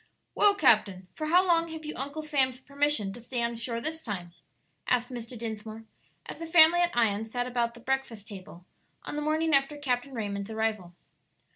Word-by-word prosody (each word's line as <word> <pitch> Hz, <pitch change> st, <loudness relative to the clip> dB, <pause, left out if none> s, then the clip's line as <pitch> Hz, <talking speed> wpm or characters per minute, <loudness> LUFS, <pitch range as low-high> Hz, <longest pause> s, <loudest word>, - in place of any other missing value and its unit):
_ -, -, -35 dB, 0.3 s
"Well, 410 Hz, -1 st, +5 dB
captain, 195 Hz, -, +3 dB
for 310 Hz, -, -4 dB
how 360 Hz, +4 st, +5 dB
long 335 Hz, -2 st, +3 dB
have 320 Hz, -1 st, -8 dB
you 305 Hz, -, -4 dB
Uncle 285 Hz, +4 st, -5 dB
Sam's 265 Hz, -4 st, +1 dB
permission 280 Hz, -7 st, 0 dB
to 240 Hz, -, -10 dB
stay 240 Hz, 0 st, -3 dB
on 235 Hz, 0 st, -1 dB
shore 230 Hz, 0 st, -3 dB
this 320 Hz, +6 st, -3 dB
time?" 180 Hz, -, -6 dB, 0.5 s
asked 245 Hz, -1 st, +1 dB
Mr. 240 Hz, 0 st, -7 dB
Dinsmore, 220 Hz, 0 st, -6 dB, 0.4 s
as -, -, -7 dB
the 330 Hz, -, -5 dB
family 325 Hz, +1 st, +7 dB
at 345 Hz, -6 st, +1 dB
Ion 215 Hz, -3 st, +2 dB
sat 245 Hz, +2 st, -3 dB
about 240 Hz, -1 st, -1 dB
the 235 Hz, -, -13 dB
breakfast 245 Hz, -6 st, -3 dB
table 185 Hz, -3 st, -11 dB, 0.4 s
on -, -, -6 dB
the 300 Hz, -, -2 dB
morning 310 Hz, +1 st, +1 dB
after 275 Hz, +2 st, +2 dB
Captain 260 Hz, -1 st, -2 dB
Raymond's 200 Hz, -2 st, -4 dB
arrival. 220 Hz, -5 st, -2 dB
245 Hz, 190 wpm, -28 LUFS, 220-300 Hz, 0.5 s, family